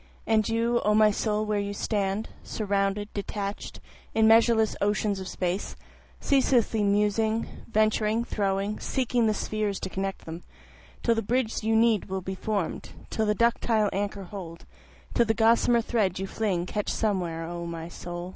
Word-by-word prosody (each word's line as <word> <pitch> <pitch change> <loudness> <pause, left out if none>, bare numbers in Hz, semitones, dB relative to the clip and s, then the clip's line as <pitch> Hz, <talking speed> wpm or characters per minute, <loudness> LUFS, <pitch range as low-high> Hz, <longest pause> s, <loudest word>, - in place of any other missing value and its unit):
And 220 -1 +2
you 230 +1 +1
O 210 0 +3
my 215 0 +6
soul 215 +1 -1
where 210 -1 0
you 200 0 -3
stand, 200 0 -1
Surrounded, 200 0 -1
detached, 200 0 -5 0.4
in 220 0 +5
measureless 225 -1 +5
oceans 205 0 +1
of 190 - -6
space, 180 +1 -3 0.4
Ceaselessly 250 -5 +2
musing, 210 +2 +2 0.2
venturing, 215 +1 +2
throwing, 200 -1 -1
seeking 245 -3 0
the 215 - +1
spheres 210 -1 -2
to 190 - -3
connect 195 0 -4
them, 165 +1 -7 0.6
Till 235 - +4
the 225 - 0
bridge 230 +1 0
you 220 +1 +1
will 220 - +5
need 200 -5 +1
be 190 - -3
form'd, 200 -2 -3 0.2
till 220 -1 0
the 210 - +2
ductile 230 -2 +2
anchor 200 0 -2
hold, 175 -3 -9 0.5
Till 235 - +3
the 220 - +2
gossamer 235 +1 +4
thread 215 -6 0
you 190 - -2
fling 190 -4 -1
catch 210 +2 -3
somewhere, 180 -6 -1
O 170 0 -5
my 165 -1 -5
soul. 175 +1 -7
210 Hz, 160 wpm, -27 LUFS, 195-225 Hz, 0.6 s, my